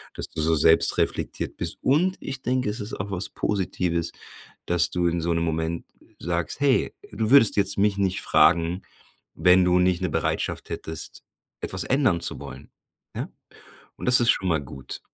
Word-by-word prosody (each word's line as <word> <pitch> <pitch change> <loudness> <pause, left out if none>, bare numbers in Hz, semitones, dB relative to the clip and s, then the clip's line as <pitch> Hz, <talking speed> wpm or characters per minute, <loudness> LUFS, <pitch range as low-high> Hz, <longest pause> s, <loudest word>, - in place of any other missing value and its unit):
Dass - - -6
du 80 - -3
so 80 +1 +3
selbst 80 +2 +4
reflektiert - - -2
bist - - -3
und 175 +8 +1
ich 135 0 -6
denke, 130 -1 -1
es 105 +4 -5
ist 105 +1 -7
auch 100 +2 -6
was 95 0 -1
Positives, 90 -4 -2 0.5
dass 85 -1 +3
du 90 -1 -1
in 85 0 -1
so 85 +1 -1
'nem 85 0 -1
Moment 80 +1 -2 0.3
sagst: 85 +7 -3
„Hey“ 140 -2 +1 0.2
du 110 -1 -2
würdest 140 -7 +6
jetzt 100 -1 +1
mich 100 0 +2
nicht 95 -1 0
fragen, 85 +3 +3 0.5
wenn 90 +3 +4
du 90 0 +3
nicht 90 -1 +1
‘ne - - -1
Bereitschaft - - -2
hättest, 80 -1 -5 0.4
etwas 95 -2 -2
ändern 130 -11 +2
zu - - -2
wollen, - - -11 0.4
ja? - - -4 0.7
Und - - -9
das 125 0 +8
ist 120 - +4
schon 95 - 0
mal 80 -3 +1
gut. 65 -1 -8
90 Hz, 180 wpm, -24 LUFS, 85-105 Hz, 0.7 s, das